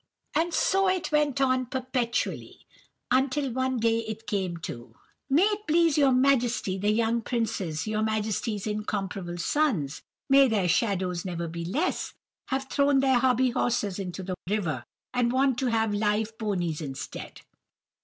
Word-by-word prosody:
"And 325 +3 +1
so 385 +3 +2
it 370 -4 -1
went 295 -3 +2
on 255 -1 +2
perpetually, 255 -2 -2 0.5
until 265 +1 +1
one 260 +1 0
day 230 0 +2
it 220 0 -6
came 190 -5 -2
to,— 120 -7 -8 0.3
"'May 295 +7 +4
it 420 0 0
please 330 -1 +4
your 280 -3 +4
Majesty, 250 -6 +2
the 205 +2 +1
young 230 +2 +2
princes, 215 -10 -2
your 215 0 -1
Majesty's 215 -1 -1
incomparable 200 -4 -3
sons—may 270 - +1
their 210 -6 +1
shadows 185 -2 0
never 170 -2 -3
be 170 +1 -5
less!—have 265 - -3
thrown 280 0 +3
their 265 -2 +4
hobbyhorses 245 -5 +1
into 190 -1 -5
the 185 0 -3 0.2
river, 170 - -1 0.3
and 245 -1 +2
want 260 -1 +2
to 265 - 0
have 225 -2 +1
live 210 +1 0
ponies 175 -8 -1
instead. 135 -3 -7
230 Hz, 140 wpm, -27 LUFS, 195-265 Hz, 0.5 s, May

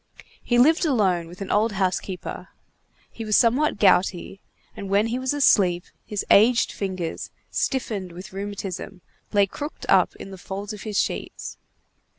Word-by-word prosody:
He 240 - 0
lived 310 +9 +5
alone 195 - +1
with 175 +3 -12
an 195 - -4
old 215 +1 +2
housekeeper. 185 -1 -3 0.6
He 225 - -7
was 215 -1 +1
somewhat 255 +5 +3
gouty, 190 -1 +2 0.3
and 200 - -7
when 200 +2 +3
he 235 +2 -2
was 260 0 -1
asleep, 190 -11 +3 0.2
his 210 -2 -3
aged 230 +4 +5
fingers, 185 -4 -4 0.2
stiffened 210 -9 -2
with 185 +4 -10
rheumatism, 195 -2 -6 0.3
lay 205 -1 +4
crooked 290 +10 -7
up - - +4
in 195 - -10
the 190 - -10
folds 200 +3 -6
of 210 - -9
his 210 -2 -4
sheets. - - -3
200 Hz, 155 wpm, -24 LUFS, 185-230 Hz, 0.6 s, lived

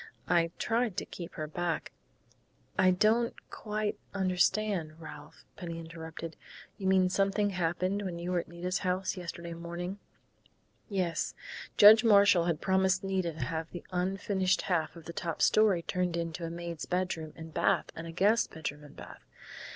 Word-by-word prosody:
I 170 0 +3
tried 225 -3 0
to - - -2
keep 170 -2 -8
her 155 - -3
back 165 +1 -2 0.4
." - - -38
"I - - +7
don't 220 +6 +3 0.2
quite 210 -1 -3 0.2
understand, 185 -3 +1
Ralph," 150 -2 -11
Penny 170 -3 -6
interrupted. 165 0 -8 0.4
"You 190 - -2
mean 190 -1 +4
something 195 +2 +1
happened 185 +2 0
when 185 -4 -4
you 175 +1 -4
were 180 - +2
at - - -6
Nita's 180 +2 -3
house 185 +1 -1
yesterday 170 -1 -6
morning?" 170 +3 -5 0.9
"Yes. 185 -5 -1 0.4
Judge 215 +3 +9
Marshall 200 -5 +6
had 170 -3 0
promised 190 -1 +2
Nita 190 -3 -1
to 150 -4 -3
have 160 +3 -3
the 175 - -8
unfinished 190 +1 0
half 160 -3 0
of 165 -2 -12
the 170 - -7
top 165 -1 -3
story 205 -6 +4
turned 180 -1 -1
into 170 0 -3
a - - -3
maid's 170 -1 -5
bedroom 180 -4 -2
and 160 -1 -10
bath - - +1
and 165 +1 -6
a - - -6
guest 205 +7 +3
bedroom 150 -2 -6
and 145 - -14
bath. - - -11
180 Hz, 165 wpm, -31 LUFS, 165-195 Hz, 0.9 s, Judge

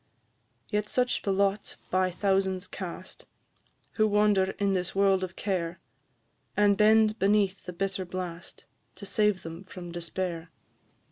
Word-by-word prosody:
Yet 210 0 -1
such 250 0 +1
the 200 - -1
lot 200 +1 0 0.2
by 185 0 +2
thousands 190 0 0
cast, 185 -1 -8 0.6
Who 215 -1 +2
wander 205 -2 +3
in 200 -1 +1
this 180 -1 -1
world 195 -1 +3
of 180 -1 -5
care, 175 -4 -2 0.8
And 205 -1 +5
bend 215 +1 +4
beneath 200 0 +2
the 180 - -5
bitter 195 +1 -2
blast, 180 -1 -7 0.3
To 200 - -9
save 210 -2 +1
them 165 +3 -8
from 180 -2 -9
despair. 170 0 -4
190 Hz, 135 wpm, -28 LUFS, 180-205 Hz, 0.8 s, And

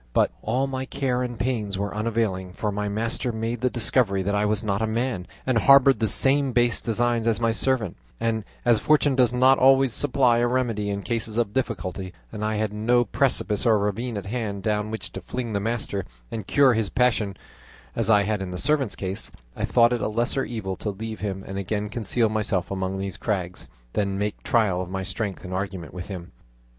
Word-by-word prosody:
But - - +3
all 130 +2 0
my 130 -1 -3
care 130 -2 -1
and 120 -2 -3
pains 110 -6 -1
were 100 +1 -2
unavailing, 105 -4 -1
for 105 +2 -2
my 105 0 -2
master 115 +4 -1
made 115 +1 -3
the 125 - +2
discovery 110 -5 +1
that 100 +2 -1
I 105 +1 +2
was 105 +1 0
not 100 0 0
a 110 - +1
man, 115 -4 -2 0.2
and 130 -3 +2
harboured 135 +2 +6
the 110 - +2
same 135 +4 +3
base 120 -2 +3
designs 120 0 0
as 115 -1 +2
my 115 -1 +2
servant; 115 - 0 0.2
and 115 -1 0 0.2
as 120 -3 +5
fortune 150 -2 +3
does 125 -2 +4
not 130 +2 +5
always 135 -1 +5
supply 125 -2 +3
a 120 - +3
remedy 120 -5 0
in 100 0 -3
cases 115 -2 -2
of 115 -4 0
difficulty, 95 -7 -3 0.2
and 105 -1 -5
I 110 0 0
had 105 -1 -1
no 120 +3 +2
precipice 115 -3 0
or 115 -3 +4
ravine 105 +3 -2
at 100 - -5
hand 100 -3 -3
down 105 0 0
which 95 -5 -6
to 95 - -7
fling 120 +4 -4
the 100 - +1
master 100 -3 -2 0.3
and 110 -4 -5
cure 140 -3 +5
his 110 -3 0
passion, 110 -6 +1 0.6
as 115 -2 0
I 105 -2 +6
had 105 -1 -1
in 95 - -4
the 90 - -5
servant's 140 -1 +1
case, 95 0 -3 0.3
I - - -1
thought 120 0 +4
it 120 - -1
a - - 0
lesser 120 +5 0
evil 100 -5 -4
to 105 - -3
leave 110 +2 -5
him 95 -2 -4
and 95 0 -5
again 105 +2 -2
conceal 115 +1 +1
myself 105 -4 -1
among 95 0 -2
these 95 -2 -4
crags, 90 -3 -3 0.3
than 100 -2 0
make 105 +1 -2
trial 105 -6 +2
of 90 - -5
my 95 0 -3
strength 95 +1 -4
and 90 0 -6
argument 95 -4 -4
with 90 0 -6
him. 90 -4 -7
110 Hz, 210 wpm, -25 LUFS, 100-120 Hz, 0.6 s, harboured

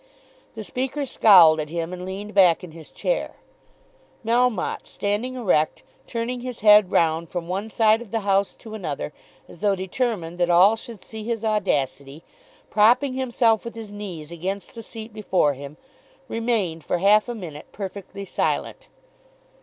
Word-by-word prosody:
The 220 - -6
Speaker 265 +6 -3
scowled 180 -10 +7
at 150 -1 -3
him 170 +1 -4
and 180 0 -6
leaned 200 +3 -6
back 185 -3 +5
in 180 - -9
his 160 -1 -12
chair. - - -2 0.9
Melmotte 235 -3 +1
standing 210 +6 -2
erect, 180 -11 +1 0.2
turning 240 +1 -3
his 250 -1 -7
head 210 -2 +7
round 165 0 +1
from 175 -2 -4
one 195 +5 -3
side 220 0 +3
of 240 - -10
the 225 +2 -2
House 200 0 +1
to 220 -2 -12
another, 150 -7 -4 0.3
as - - -14
though 205 -1 +2
determined 190 -3 -3
that 175 0 +2
all 185 +5 +6
should 225 -3 -9
see 220 +2 -8
his 225 0 -3
audacity, 150 -8 -1 0.5
propping 240 +6 +4
himself 240 -4 +1
with 235 - -7
his 220 -2 -8
knees 180 -7 -7
against 190 +4 -5
the 230 - -8
seat 225 0 -10
before 185 -8 +1
him, 140 +2 -10 0.5
remained 225 - -1
for - - -1
half 210 +5 +4
a 240 - -3
minute 160 -8 -8
perfectly 200 0 -7
silent. - - -2
205 Hz, 160 wpm, -23 LUFS, 175-225 Hz, 0.9 s, scowled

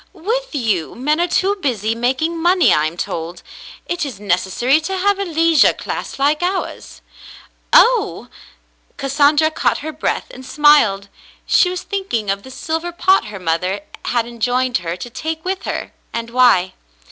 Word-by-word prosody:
"With 450 +4 -3
you, 215 - -1
men 300 +6 0
are 350 - +2
too 390 +3 +1
busy 225 -6 -1
making 265 +8 -1
money, 350 +1 +4
I 150 +1 +2
am 165 +2 -8
told. 170 0 -5 0.4
It 345 -1 -2
is 260 -9 -6
necessary 205 - +1
to 380 +4 -3
have 400 +1 +1
a 395 - -1
leisure 330 -2 +4
class - - -6
like 290 +3 +1
ours." 370 +2 -4 0.7
"Oh!" 485 -2 +4 0.7
Cassandra 290 +3 +2
caught 310 - -1
her 315 - -3
breath 310 +1 -2
and 260 - -11
smiled. 260 -9 +3 0.4
She 360 - +4
was 365 0 -4
thinking 240 - -2
of 200 0 -3
the 260 - -13
silver 325 +6 -4
pot 375 -2 +2
her 210 -2 -8
mother 180 +3 -1 0.2
had 235 -2 0
enjoined 245 +2 0
her 170 0 -4
to 245 - -7
take 320 +6 -5
with 380 +1 -3
her, - - -4 0.2
and 230 0 -5
why. 235 -8 +4
280 Hz, 160 wpm, -18 LUFS, 220-345 Hz, 0.7 s, money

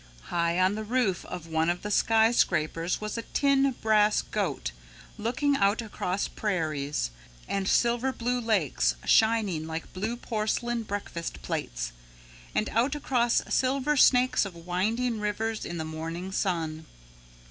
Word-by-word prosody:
High 170 0 +1
on 185 +2 +4
the 215 +1 -4
roof 215 -5 0
of 175 - -7
one 160 0 +1
of 175 0 -1
the 210 - -3
skyscrapers 180 -8 +2
was 215 +2 -4
a - - -2
tin 275 +2 +2
brass 215 -1 +4
goat - - -2 0.5
looking 280 +6 +1
out 200 -2 +2
across 200 -4 -2
prairies, 155 - -2 0.4
and 195 -1 -1
silver 240 +2 +2
blue 245 0 -1
lakes 150 - +1
shining 215 -8 +3
like 160 0 -6
blue 215 +6 -2
porcelain 235 +1 -1
breakfast 185 - -5
plates, - - -3 0.6
and 215 - +1
out 245 +6 +1
across 245 -5 +1
silver 270 +3 +2
snakes 255 -1 +5
of 195 -4 -6
winding 215 +8 -1
rivers 215 +1 -2
in 175 - -5
the 160 - -3
morning 165 +4 -5
sun. 160 -5 -2
210 Hz, 135 wpm, -28 LUFS, 170-235 Hz, 0.6 s, snakes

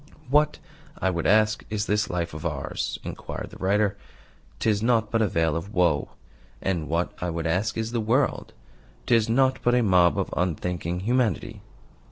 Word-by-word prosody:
"What, 150 +1 +3 0.4
I 95 - +1
would 85 -2 -1
ask, 110 +1 +3
is 105 -1 -1
this 105 0 0
life 85 -2 -2
of 80 0 -7
ours?" 75 -5 -3
inquired - - -6
the - - -11
writer. 100 +1 +2 0.6
"'Tis 105 -2 +1
nought 115 -2 +2
but 115 - +2
a 110 - +3
vale 80 -3 +1
of 90 +5 -5
woe. 85 -5 +2 0.5
And 85 -5 -2
what, 85 +2 0
I 90 - -1
would 85 -1 -3
ask, 95 +7 0
is 115 0 -2
the 120 -1 -1
world? 125 +6 0 0.5
'Tis 115 -2 +3
nought 130 +2 +3
but 120 0 +3
a 125 - +3
mob 90 -4 +4
of - - -2
unthinking 90 0 -2
humanity." 120 -2 0
100 Hz, 175 wpm, -25 LUFS, 85-115 Hz, 0.6 s, mob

